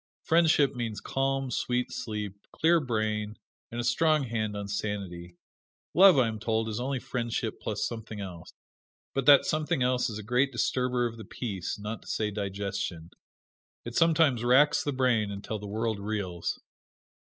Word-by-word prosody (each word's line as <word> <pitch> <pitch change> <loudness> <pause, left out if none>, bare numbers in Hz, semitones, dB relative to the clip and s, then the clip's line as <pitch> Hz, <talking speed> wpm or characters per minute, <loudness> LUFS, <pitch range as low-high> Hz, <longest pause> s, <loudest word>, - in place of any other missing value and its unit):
Friendship 160 -4 +4
means 115 -4 -3
calm, 135 -1 -1
sweet 125 +1 -1
sleep, 105 -2 -5
clear 170 +1 +3
brain 110 -5 -2 0.3
and 120 - -5
a - - -1
strong 150 +3 +2
hold 110 -2 -2
on 100 -1 -4
sanity. 100 -4 -4 0.6
Love 190 -2 +8
I 125 -3 +4
am 110 -1 -4
told 110 0 0
is 110 +1 -3
only 135 +2 -1
friendship, 120 -3 -3
plus 105 0 -2
something 110 -2 -6
else. 90 -4 -8 0.6
But 135 0 -1
that 145 -1 +8
something 150 -4 0
else 125 0 +1
is 110 - -5
a 110 - -7
great 125 +5 +2
disturber 125 0 0
of 115 -1 -4
the 110 - -8
peace, 100 -8 -4
not 105 +2 -5
to - - -17
say 105 -1 -1
digestion. 100 -4 -4 0.7
It 120 - -6
sometimes 160 -6 +3
racks 130 +5 +4
the 145 - -1
brain 125 -6 +2
until 100 +2 -5
the 105 - -7
world 110 +1 -2
reels. 100 -4 -3
115 Hz, 165 wpm, -28 LUFS, 105-130 Hz, 0.7 s, Love